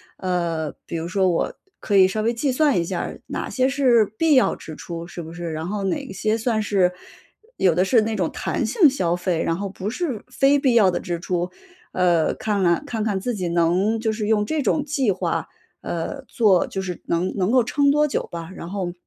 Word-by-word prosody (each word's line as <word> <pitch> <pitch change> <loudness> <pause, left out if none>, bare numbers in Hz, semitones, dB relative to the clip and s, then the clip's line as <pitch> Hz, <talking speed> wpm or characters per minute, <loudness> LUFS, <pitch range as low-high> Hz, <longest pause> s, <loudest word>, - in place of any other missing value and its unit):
呃， 170 -4 -2
比 - - -6
如 165 0 -3
说 190 0 +2
我 170 - 0 0.3
可 205 - -1
以 190 -1 +7
稍 215 +3 -2
微 225 +2 +1
计 260 +4 0
算 285 - +3
一 - - +1
下 - - -3
儿， - - -6
哪 - - -4
些 260 -1 +1
是 260 -5 +4
必 320 +3 +3
要 255 - +4
支 155 - -9
出， 170 +1 -7
是 175 0 -9
不 160 +1 -9
是？ 175 -1 -5
然 160 +1 -4
后 205 +1 -3
哪 190 +1 -3
些 215 +3 0
算 225 -1 0
是 195 -4 +2 0.6
有 180 -3 +3
的 180 +3 +2
是 225 +4 +4
那 220 0 -2
种 180 -5 0
弹 - - -2
性 405 -10 +4
消 185 -11 +1
费， 175 -2 -1
然 165 - 0
后 200 +1 -3
不 195 +1 -5
是 255 - -3
非 275 +2 +3
必 260 -3 +2
要 200 -5 +5
的 - - -2
支 175 -2 -4
出。 180 0 -2 0.4
呃， 175 -3 +2
看 210 -2 -1
来 170 -2 +2
看 225 -3 -3
看 205 -3 0
自 245 +6 -2
己 185 -5 -3
能 175 +6 +2
就 220 0 0
是 215 -1 -3
用 210 -1 +2
这 310 +7 -1
种 290 +2 +1
计 275 -6 +1
划， 190 - -2 0.3
呃， 175 - -4
做 205 -7 +3
就 190 - -4
是 180 -2 -5
能 170 +2 0
能 190 -1 0
够 250 +1 +4
撑 280 +4 +2
多 300 +1 +3
久 285 - -3
吧。 170 0 -6
然 170 - -8
后， 185 -2 -3
195 Hz, 240 characters per minute, -22 LUFS, 175-235 Hz, 0.6 s, 以